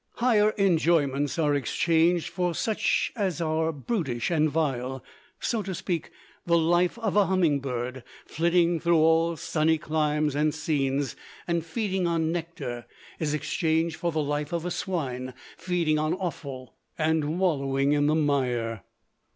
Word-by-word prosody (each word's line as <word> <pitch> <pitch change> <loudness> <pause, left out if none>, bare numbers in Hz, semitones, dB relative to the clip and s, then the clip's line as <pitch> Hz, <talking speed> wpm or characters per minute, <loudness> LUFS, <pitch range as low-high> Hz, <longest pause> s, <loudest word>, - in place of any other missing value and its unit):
Higher 220 -4 +3
enjoyments 160 -7 +2
are 150 -3 +2
exchanged 165 +5 +2
for 175 -1 -1
such 220 -2 0
as 195 - -1
are 160 0 0
brutish 145 - -2
and 155 -2 +3
vile, 135 -4 -2 0.4
so 230 -3 -1
to 190 -2 -4
speak, 170 -2 -3 0.3
the 170 0 +3
life 175 +4 +2
of 220 -4 -2
a 205 -2 +4
humming 175 -7 +2
bird, 125 -1 -4 0.2
flitting 170 +1 +2
through 170 +1 +3
all 165 +1 +3
sunny 160 +1 +1
climes 150 -1 0
and 150 +1 +1
scenes 140 -4 -1 0.3
and 170 -2 0
feeding 190 0 -1
on 165 -1 0
nectar, 155 -8 -5 0.3
is 150 -2 0
exchanged 160 +2 0
for 170 - -1
the 155 -1 0
life 145 0 -2
of 170 -1 -2
a 180 - -2
swine, 130 -10 -3 0.2
feeding 170 -3 0
on 155 +3 0
offal, 140 -8 -6 0.2
and 155 0 0
wallowing 140 -6 +1
in 145 0 +3
the 155 - +3
mire. 125 -7 0
160 Hz, 145 wpm, -26 LUFS, 145-170 Hz, 0.4 s, a